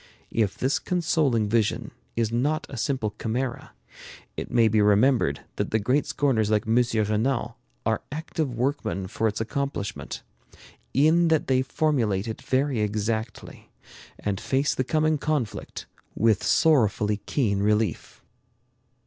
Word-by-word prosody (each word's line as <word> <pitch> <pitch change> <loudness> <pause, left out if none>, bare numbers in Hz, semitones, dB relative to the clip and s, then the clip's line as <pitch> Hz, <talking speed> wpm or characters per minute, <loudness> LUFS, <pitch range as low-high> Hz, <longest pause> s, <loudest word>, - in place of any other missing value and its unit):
If 105 -4 0
this 130 +2 +1
consoling 155 - +1
vision 110 0 0 0.2
is 115 -1 0
not 145 +7 0
a - - -6
simple 115 -3 -1
chimera, 120 +2 -3 0.6
it - - -5
may 115 -2 +4
be 110 0 +3
remembered 105 - +3 0.2
that - - -1
the 110 - +2
great 125 +7 +1
scorners 115 -7 +1
like 105 -1 +1
M. 110 +1 +1
Renan 115 +1 +1 0.3
are - - +1
active 155 -1 -3
workmen 120 -5 -2
for 110 +4 -1
its 105 - -2
accomplishment, 115 -2 -4 0.7
in 160 +5 +4
that 160 -2 +2
they 130 -1 +2
formulate 125 -8 0
it 110 - -5
very 135 -1 0
exactly, 110 +2 -3 0.5
and 100 -2 -3
face 135 +2 +1
the 130 - 0
coming 155 +4 +1
conflict 140 -6 -3 0.3
with 110 -2 +3
sorrowfully 110 - +3
keen 105 -8 +1
relief. 105 +1 -1
115 Hz, 130 wpm, -25 LUFS, 105-140 Hz, 0.7 s, may